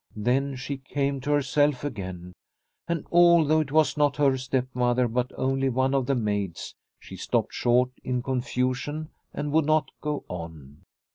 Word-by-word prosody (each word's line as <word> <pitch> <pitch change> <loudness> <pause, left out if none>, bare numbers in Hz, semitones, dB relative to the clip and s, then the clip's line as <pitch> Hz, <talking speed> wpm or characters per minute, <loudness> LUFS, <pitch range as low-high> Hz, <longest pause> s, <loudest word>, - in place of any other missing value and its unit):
Then 130 +6 0
she 135 +2 -5
came 140 0 -2
to 145 - -2
herself 145 -1 +2
again, 95 -9 -6 0.5
and 170 -2 -2
although 170 -3 +5
it 150 -3 -2
was 155 -2 +3
not 145 -1 +2
her 140 -2 +3
stepmother 125 -1 0
but 125 +2 -1
only 135 0 +1
one 130 +2 +1
of 135 -2 +1
the 140 - +2
maids, 105 -6 -2 0.3
she - - -11
stopped - - -1
short 125 +1 +2
in 125 -1 -2
con 130 -1 -1
fusion 135 +4 -2 0.2
and 145 - -4
would 160 0 +3
not 155 0 +2
go 150 -1 -3
on. 80 -5 -8
135 Hz, 160 wpm, -26 LUFS, 125-145 Hz, 0.5 s, although